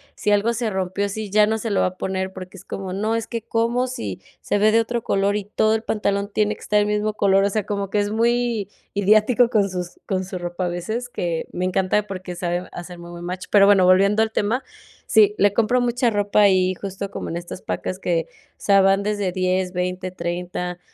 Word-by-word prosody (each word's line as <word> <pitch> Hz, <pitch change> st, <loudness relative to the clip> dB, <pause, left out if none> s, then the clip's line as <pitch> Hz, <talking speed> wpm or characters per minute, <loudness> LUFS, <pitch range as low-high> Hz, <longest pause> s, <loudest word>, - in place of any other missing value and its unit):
si 210 Hz, -, 0 dB
algo 205 Hz, +3 st, +2 dB
se 235 Hz, -1 st, -1 dB
rompió, 190 Hz, +1 st, -1 dB
sí, 215 Hz, +1 st, -5 dB
ya 210 Hz, +1 st, +5 dB
no 220 Hz, 0 st, 0 dB
se 225 Hz, -, -3 dB
lo 200 Hz, -, +2 dB
va -, -, +3 dB
a 185 Hz, 0 st, -7 dB
poner, 190 Hz, 0 st, -3 dB
porque 185 Hz, 0 st, -9 dB
es -, -, -14 dB
como: 190 Hz, -1 st, -5 dB
“No, 215 Hz, +4 st, -1 dB
es 230 Hz, -1 st, -2 dB
que 230 Hz, -2 st, -4 dB
como 235 Hz, +3 st, 0 dB
si 100 Hz, -, -5 dB, 0.2 s
se -, -, 0 dB
ve 215 Hz, +1 st, +4 dB
de 230 Hz, -, +4 dB
otro 235 Hz, 0 st, -3 dB
color 200 Hz, +1 st, +1 dB
y 205 Hz, -, -5 dB
todo 215 Hz, +1 st, +1 dB
el 220 Hz, -, -3 dB
pantalón 200 Hz, -1 st, -1 dB
tiene 210 Hz, 0 st, +1 dB
que -, -, -19 dB
estar 210 Hz, -, +2 dB
el 205 Hz, -, +1 dB
mismo 210 Hz, +1 st, 0 dB
color”, 195 Hz, -1 st, +3 dB
o 200 Hz, -, +2 dB
sea, 215 Hz, +1 st, 0 dB
como 200 Hz, -1 st, -3 dB
que 210 Hz, -, +1 dB
es 205 Hz, 0 st, 0 dB
muy 235 Hz, -2 st, +1 dB, 0.3 s
ideático 215 Hz, +4 st, +4 dB
con 205 Hz, -4 st, +2 dB
sus 180 Hz, -1 st, -6 dB
con 190 Hz, -1 st, -1 dB
su 185 Hz, 0 st, -6 dB
ropa 175 Hz, +1 st, -3 dB
a -, -, -1 dB
veces, 220 Hz, +8 st, -4 dB
que 170 Hz, -7 st, -3 dB
me 180 Hz, -, -2 dB
encanta 190 Hz, +3 st, +1 dB
porque 185 Hz, -2 st, -6 dB
sabe 175 Hz, 0 st, -2 dB
hacer 175 Hz, 0 st, -8 dB
muy 170 Hz, 0 st, -10 dB
buen 175 Hz, 0 st, -9 dB
match. 180 Hz, +1 st, -5 dB
Pero 200 Hz, -1 st, +6 dB
bueno, 195 Hz, -3 st, +5 dB
volviendo 200 Hz, +4 st, +4 dB
al 220 Hz, -, -2 dB
tema, 220 Hz, +5 st, 0 dB, 0.4 s
sí, 210 Hz, -1 st, +5 dB
le 200 Hz, 0 st, +4 dB
compro 235 Hz, +3 st, +2 dB
mucha 245 Hz, 0 st, +1 dB
ropa 205 Hz, 0 st, +1 dB
ahí 185 Hz, -2 st, +4 dB
justo 195 Hz, +1 st, -6 dB
como -, -, -5 dB
en 170 Hz, -, -3 dB
estas 175 Hz, +1 st, -8 dB
pacas 185 Hz, -, -4 dB
que, 170 Hz, -4 st, 0 dB
o -, -, -28 dB
sea, 200 Hz, -1 st, +4 dB
van 195 Hz, +1 st, +3 dB
desde 205 Hz, -2 st, -1 dB
10 185 Hz, 0 st, 0 dB
20 180 Hz, +1 st, -2 dB
30. 180 Hz, 0 st, -4 dB
200 Hz, 235 wpm, -22 LUFS, 185-215 Hz, 0.4 s, Pero